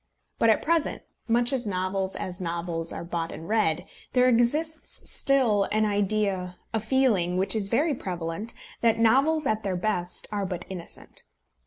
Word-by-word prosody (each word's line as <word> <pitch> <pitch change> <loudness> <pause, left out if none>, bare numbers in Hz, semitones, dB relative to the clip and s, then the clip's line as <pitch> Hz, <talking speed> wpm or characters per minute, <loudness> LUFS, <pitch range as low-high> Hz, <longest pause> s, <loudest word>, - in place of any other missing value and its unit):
But 230 - +4
at 220 - +3
present, 330 -1 0 0.2
much 240 +3 +3
as 245 -4 -2
novels, 190 0 -2
as 185 +1 -4
novels, 170 -1 -2
are - - -5
bought 170 -1 -3
and 160 +2 -8
read, 185 -5 +1 0.3
there 250 0 +4
exists 295 +7 +2
still 240 -8 +3
an 215 +2 +1
idea, 200 -3 0 0.2
a 225 - +1
feeling 215 -7 +1
which 190 +4 +4
is 200 -3 0
very 295 +8 +2
prevalent, 180 0 -5 0.3
that 230 -1 +3
novels 275 +7 +3
at 215 -3 0
their 195 -3 -2
best 180 -2 -2
are 200 -2 -2
but 180 -2 -5
innocent. 175 -3 -6
210 Hz, 160 wpm, -26 LUFS, 180-240 Hz, 0.3 s, But